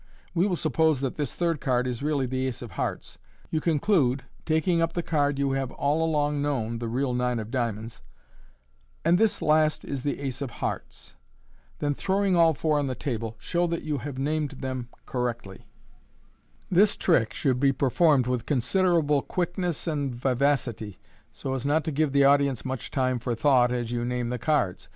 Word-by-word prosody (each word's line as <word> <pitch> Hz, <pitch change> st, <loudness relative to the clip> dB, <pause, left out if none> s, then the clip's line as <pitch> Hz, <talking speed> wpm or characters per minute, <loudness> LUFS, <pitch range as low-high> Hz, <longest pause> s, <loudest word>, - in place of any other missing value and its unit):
We 180 Hz, +3 st, +2 dB
will 185 Hz, -, 0 dB
suppose 155 Hz, -2 st, +2 dB
that 135 Hz, -2 st, -1 dB
this 145 Hz, -4 st, -3 dB
third 170 Hz, -3 st, 0 dB
card 125 Hz, -2 st, +1 dB
is 125 Hz, -1 st, -3 dB
really 145 Hz, -2 st, 0 dB
the 130 Hz, +1 st, -1 dB
ace 125 Hz, -1 st, -5 dB
of 115 Hz, -, -9 dB
hearts. -, -, -4 dB, 0.3 s
You 155 Hz, -, 0 dB
conclude, 145 Hz, -, +2 dB, 0.2 s
taking 165 Hz, +2 st, +2 dB
up 165 Hz, -, 0 dB
the 175 Hz, -, -2 dB
card 145 Hz, -3 st, +1 dB
you 140 Hz, -1 st, +1 dB
have 135 Hz, -1 st, -1 dB
all 150 Hz, +3 st, +1 dB
along 150 Hz, -2 st, +1 dB
known 115 Hz, -6 st, -1 dB
(the 115 Hz, -, -3 dB
real 125 Hz, +3 st, -1 dB
nine 125 Hz, 0 st, 0 dB
of 110 Hz, 0 st, -5 dB
diamonds), 115 Hz, -3 st, -3 dB, 0.5 s
" -, -, -37 dB
And 170 Hz, +2 st, +4 dB
this 220 Hz, -1 st, +2 dB
last 155 Hz, 0 st, +2 dB
is 140 Hz, -2 st, -4 dB
the 145 Hz, -, -2 dB
aci 135 Hz, -1 st, -4 dB
of 140 Hz, -, -2 dB
hearts." -, -, -6 dB, 0.6 s
Then, 145 Hz, 0 st, 0 dB
throwing 195 Hz, +4 st, +1 dB
all 165 Hz, -2 st, +5 dB
four 155 Hz, +1 st, +1 dB
on 145 Hz, -, -1 dB
the 130 Hz, -, -2 dB
table, 115 Hz, -5 st, -4 dB
show 175 Hz, +8 st, 0 dB
that 170 Hz, 0 st, -3 dB
yon 150 Hz, -2 st, -2 dB
have 140 Hz, 0 st, -6 dB
named 150 Hz, +1 st, -1 dB
them 130 Hz, -2 st, -5 dB, 0.2 s
correctly. 120 Hz, -6 st, -4 dB, 1.0 s
This 200 Hz, +3 st, +4 dB
trick 130 Hz, -11 st, +2 dB
should 130 Hz, -3 st, +1 dB
be 135 Hz, 0 st, +4 dB
performed 135 Hz, +1 st, +3 dB
with 125 Hz, -2 st, -2 dB
considerable 150 Hz, +1 st, +2 dB
quickness 175 Hz, -1 st, -2 dB
and 145 Hz, -6 st, -2 dB
vivacity, 125 Hz, -5 st, 0 dB, 0.3 s
so 135 Hz, -, -5 dB
as 130 Hz, -2 st, -3 dB
not 150 Hz, +3 st, +2 dB
to 160 Hz, -, -2 dB
give 150 Hz, 0 st, +1 dB
the 140 Hz, 0 st, +4 dB
audience 140 Hz, -3 st, +3 dB
much 130 Hz, -2 st, -4 dB
time 130 Hz, -2 st, 0 dB
for 120 Hz, 0 st, -2 dB
thought 125 Hz, -1 st, +4 dB
as 120 Hz, -2 st, -2 dB
you 120 Hz, -1 st, -1 dB
name 125 Hz, 0 st, -2 dB
the 125 Hz, 0 st, -3 dB
cards. 140 Hz, -, 0 dB
140 Hz, 190 wpm, -26 LUFS, 125-155 Hz, 1.0 s, all